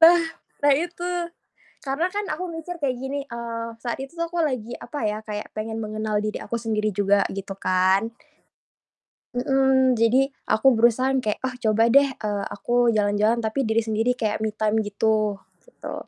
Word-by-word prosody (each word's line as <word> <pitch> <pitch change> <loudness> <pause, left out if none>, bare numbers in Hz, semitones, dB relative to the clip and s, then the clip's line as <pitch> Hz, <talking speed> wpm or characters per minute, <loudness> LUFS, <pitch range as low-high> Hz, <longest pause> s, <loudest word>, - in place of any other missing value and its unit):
Bah 340 +1 +8 0.4
nah 290 -1 +6
itu, 350 +2 -3 0.7
karena 280 +6 0
kan 410 +2 -3
aku 365 0 -3
mikir 335 +1 -6
kayak 265 -3 0
gini, 265 +3 -4
eee, 230 -1 -5 0.2
saat 240 +1 -3
itu 270 +5 -7
tuh 335 0 -3
aku 345 - -2
lagi 255 -7 -1
apa 290 -6 -6
ya, 210 0 -1
kayak 210 0 -5
pengen 220 +1 -4
mengenal 215 0 -2
diri 215 - -3
aku 235 - -4
sendiri 215 -3 -1
juga 200 0 +3
gitu 195 0 -6
kan. 190 +4 +2 1.2
Mhm, 265 0 +3
jadi 235 +4 +4 0.2
aku 265 +3 +5
berusaha 235 +3 +3
yang 260 - +1
kayak, 210 -1 -1
"Ah 255 - -4
coba 225 -2 +2
deh, 280 +4 +5
eee, 205 -2 -2
aku 240 +4 +2
jalan-jalan 210 +2 +2
tapi 230 +4 -1
diri 220 -1 +1
sendiri 225 +2 0
kayak 215 -1 -1
me 220 - 0
time 215 +1 0
gitu." 210 0 0 0.2
Gitu. - - -9
230 Hz, 170 wpm, -24 LUFS, 215-270 Hz, 1.2 s, Bah